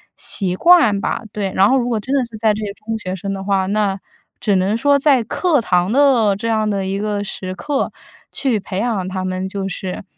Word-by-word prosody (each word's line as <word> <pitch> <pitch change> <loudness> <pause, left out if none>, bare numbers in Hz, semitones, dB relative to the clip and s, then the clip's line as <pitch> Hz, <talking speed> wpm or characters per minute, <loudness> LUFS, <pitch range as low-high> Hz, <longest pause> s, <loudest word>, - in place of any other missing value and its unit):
习 185 -3 -1
惯 245 - +5
吧。 - - -2
对， 200 -2 -2
然 195 +2 +4
后 265 - +4
如 245 0 -1
果 230 -3 0
真 260 +7 -2
的 275 - +3
是 225 - -9
在 215 0 +2
这 215 +1 -4
个 205 - -3
中 225 0 -2
学 185 -2 -4
生 195 +2 -4
的 195 -1 -5
话， 195 -1 +1
那 200 0 0 0.4
只 205 - +1
能 190 +4 +1
说 285 +4 +3
在 275 -4 +3
课 310 +7 +1
堂 180 -3 +1
的 245 -6 +4
这 230 +3 -4
样 220 -1 +1
的 200 -2 -1
一 190 +1 -2
个 205 -1 -2
时 185 -2 -5
刻 270 +10 -2 0.4
去 255 -6 0
培 185 -1 -6
养 210 -5 -1
他 185 0 -3
们 185 0 -3
就 195 0 -4
是， 185 0 -5
205 Hz, 240 characters per minute, -19 LUFS, 190-230 Hz, 0.4 s, 惯